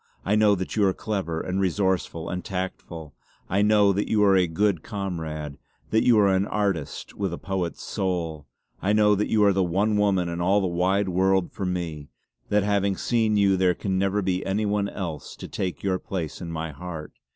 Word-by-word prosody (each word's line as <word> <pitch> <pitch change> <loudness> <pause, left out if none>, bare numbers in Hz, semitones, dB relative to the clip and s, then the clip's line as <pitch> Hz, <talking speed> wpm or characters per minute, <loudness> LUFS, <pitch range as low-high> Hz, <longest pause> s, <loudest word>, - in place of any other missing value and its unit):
I 100 - +1
know 105 -1 +5
that 95 0 -4
you 105 - +2
are 95 - 0
clever 95 -7 -3
and 95 +1 -2
resourceful 95 -3 0
and 90 0 -4
tactful. 90 -5 -5 0.3
I 95 +2 +1
know 105 -1 +4
that 100 +2 -1
you 105 -1 +3
are 100 -1 +5
a 90 -2 +3
good 90 +1 +1
comrade; 80 - -5 0.3
that 110 - +3
you 120 -3 +5
are 105 -1 +5
an 95 +2 +1
artist 100 -8 -2
with 100 -3 -2
a 85 - -4
poet's 95 -4 -3
soul. 85 -6 -3 0.3
I 100 +2 +1
know 105 -1 +5
that 105 +1 0
you 105 -1 +3
are 100 -1 +5
the 95 - +1
one 100 +5 +1
woman 100 -4 +2
in 85 0 -3
all 95 +4 +3
the 95 - 0
wide 95 +3 +1
world 95 0 +2
for 95 - -4
me; 80 -5 -4 0.4
that 105 -1 +3
having 100 -1 +1
seen 110 -3 +1
you 100 -1 +4
there 90 -1 +3
can 95 0 -1
never 100 +1 +1
be 90 0 0
any 100 +3 -1
one 100 -1 0
else 85 -7 -6
to - - -8
take 90 -6 -4
your 95 -2 0
place 85 -5 -5
in 85 -2 -5
my 80 0 -4
heart. 80 +1 -8
95 Hz, 205 wpm, -25 LUFS, 85-100 Hz, 0.4 s, know